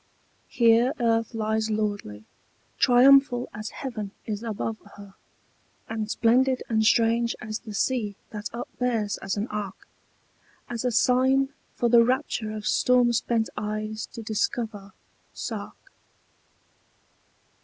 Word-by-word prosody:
Here 235 +2 +4
earth 230 -1 +1
lies 220 0 0
lordly, 205 - -3 0.5
triumphal 255 0 +5
as 215 +1 -6
heaven 220 -7 -5 0.2
is 210 -1 -4
above 225 -1 -3 0.2
her, 200 -1 -12 0.7
And 220 -1 -4
splendid 250 +3 +2
and 220 -1 +2
strange 230 +1 +3
as 215 -2 -5
the 215 -3 -9
sea 215 -4 0 0.2
that 210 0 -5
upbears 235 -3 -2
as 195 +1 -3
an 205 - -1
ark, 205 -2 -6 0.8
As 235 -1 -4
a 250 - +1
sign 260 +4 +3 0.3
for 240 - +1
the 235 0 +6
rapture 250 -3 -1
of 215 -1 -6
storm 250 -1 +3
spent 230 -1 0
eyes 215 +1 -4
to 230 - -7
discover, 215 -2 -3 0.4
Sark. - - -5
225 Hz, 120 wpm, -26 LUFS, 215-245 Hz, 0.8 s, the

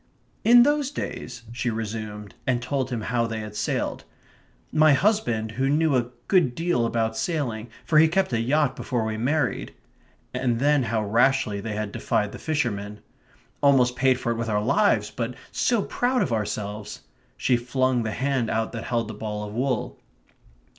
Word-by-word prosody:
"In 240 +2 +8
those 290 0 +2
days 125 - -6
..." - - -12
she 120 +1 -2
resumed, 110 -2 -5
and 125 -2 +2
told 130 +1 -2
him 120 -3 -3
how 115 +1 0
they 110 -1 -4
had 105 -1 -8
sailed... - - -2 0.7
"my 155 -1 +5
husband, 135 - +1
who 135 +3 0
knew 155 0 +3
a 120 -1 +1 0.2
good 170 -11 +3
deal 165 -9 +1
about 115 -1 -1
sailing, 120 -4 -2 0.2
for 155 -2 +4
he 160 - +7
kept 185 -3 0
a 115 - +1
yacht 140 +2 +2
before 120 -4 -2
we 110 0 -2
married"... 135 +4 -1 0.6
and 120 -3 0
then 145 +3 +3
how 110 -2 -1
rashly 115 -1 +2
they 110 0 -4
had 105 -1 -3
defied 105 0 -1
the - - -9
fishermen, 105 -9 -2 0.6
"almost 130 -3 +4
paid 130 0 +3
for 120 - -1
it 115 - -2
with 115 0 -2
our 105 -1 +1
lives, 130 - +2
but 120 +1 -4 0.2
so 235 -5 +1
proud 250 +1 +1
of 120 - -2
ourselves!" 105 -1 -4 0.4
She 125 - +2
flung 125 +1 +1
the 110 - -2
hand 130 0 0
out 110 0 -1
that 115 -1 -6
held 115 -2 -1
the 110 - -6
ball 105 0 -4
of 105 - -9
wool. 125 +1 -2
120 Hz, 180 wpm, -25 LUFS, 110-140 Hz, 0.7 s, In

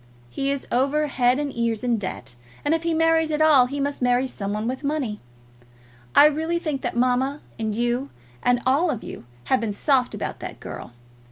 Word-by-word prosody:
He 275 - -2
is 280 -1 -2
over 280 +5 +2
head 255 -3 +2
and 290 -1 -3
ears 230 -1 -1
in 240 -3 +1
debt, 185 -9 -5 0.3
and 290 - +3
if 325 - +1
he 335 0 -1
marries 325 0 +3
at 305 -1 -1
all, 295 -5 +6
he 285 +3 -4
must 280 0 -2
marry 245 +1 +3
some 200 -6 -4
one 210 +2 -2
with 260 +3 -3
money. 280 -8 -2 1.0
I - - +9
really 320 +3 +1
think 305 -6 -3
that - - -3
mamma, 255 +4 +1 0.2
and 220 -1 -2
you, 240 +4 -1 0.3
and 245 0 +2
all 285 +7 +3
of 245 -7 -3
you - - -9 0.2
have 260 - +1
been 220 -3 -2
soft 255 +3 +1
about - - -4
that - - -7
girl. 120 - -8
265 Hz, 200 wpm, -24 LUFS, 240-300 Hz, 1.0 s, I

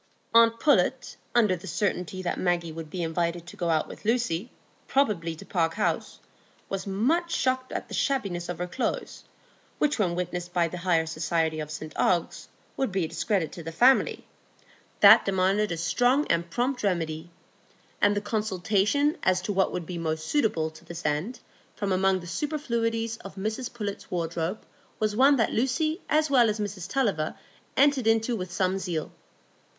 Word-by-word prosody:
Aunt 230 0 +6
Pullet, 260 -2 +2 0.2
under 215 -6 +4
the 180 +2 -10
certainty 185 0 -2
that 175 - -2
Maggie 175 -2 0
would 160 -1 -7
be 175 +1 -3
invited 170 +1 -1
to 175 - -11
go 170 -2 -2
out 160 -1 +1
with - - -11
Lucy, 225 -3 0 0.4
probably 195 -12 +1
to - - -12
Park 165 -3 0
House, 210 - -1 0.5
was 195 0 -4
much 295 - +1
shocked 255 -3 0
at - - -4
the - - -10
shabbiness 195 - -1
of 175 - -3
her 180 - -2
clothes, 215 +8 -3 0.5
which 295 -4 +1
when 180 -4 +1
witnessed 175 0 -4
by 175 -2 +2
the 180 +2 -6
higher 170 -2 +2
society 160 0 -1
of 150 -1 -5
St 155 0 -7
Ogg's, 175 -3 +1 0.3
would 265 -6 -1
be 185 -2 0
a - - -3
discredit 190 -2 -1
to 175 - -8
the 165 0 -6
family, 250 +11 +3 0.8
that 215 +3 +9
demanded 195 +1 +1
a 170 - -2
strong 245 - +2
and 170 0 0
prompt 245 +8 -1
remedy; 165 -4 -1 0.7
and 205 0 +4
the 205 - 0
consultation 210 - +1
as 185 0 +2
to 205 - -2
what 190 0 +2
would 175 -2 -4
be 175 0 -5
most 160 -1 -2
suitable 170 - +1
to 155 - -16
this 170 0 -8
end 155 +12 -1 0.4
from 200 -2 -2
among 190 0 +2
the - - -10
superfluities 230 - -2
of 195 - -11
Mrs 220 +5 -3
Pullet's 205 -4 -5
wardrobe 170 +2 -3 0.3
was 215 -1 0
one 275 +4 +6
that 230 -4 +1
Lucy 310 - 0
as 310 0 +3
well 245 -4 +5
as 215 +1 -2
Mrs 205 -3 -4
Tulliver 200 -13 0 0.4
entered 275 -4 +4
into 225 +2 +2
with 180 -4 -5
some 190 0 0
zeal. 175 -5 -3
190 Hz, 175 wpm, -27 LUFS, 170-230 Hz, 0.8 s, that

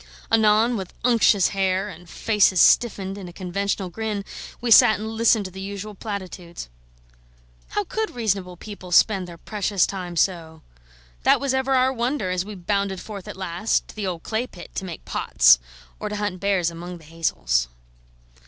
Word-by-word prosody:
Anon, 225 +2 +4
with 190 -3 -7
unctuous 230 -5 +4
hair 190 0 0
and 180 -4 -11
faces 205 -4 +2
stiffened 195 -1 +3
in 190 - -8
a - - -9
conventional 190 +1 -3
grin, 215 -1 -3 0.3
we 240 -1 -2
sat 225 0 +8
and 220 +1 -4
listened 225 -1 +2
to 185 - -6
the 190 +1 -8
usual 200 +2 -6
platitudes. 185 - -7 1.0
How 205 - -1
could 440 - -2
reasonable 195 -7 -2
people 195 -2 -10
spend 190 0 +4
their 170 -1 -10
precious 200 0 0
time 180 -3 -5
so? 165 -2 -1 0.6
That - - +4
was 275 -1 -1
ever 265 0 +1
our 260 +1 +3
wonder 235 -5 -1
as 180 0 0
we 210 +1 -8
bounded 195 +1 -1
forth 200 -2 -8
at - - -8
last 190 +3 -1
to - - -12
the 210 -3 -3
old 175 -3 -4
clay 230 +3 -2
pit 175 -6 -12
to 190 - -4
make 175 -3 -8
pots, - - +4 0.4
or 210 - -4
to 210 - -4
hunt 205 -3 -3
bears 190 -4 +1
among 175 +2 -8
the 165 - -17
hazels. 60 - 0
195 Hz, 175 wpm, -23 LUFS, 180-215 Hz, 1.0 s, sat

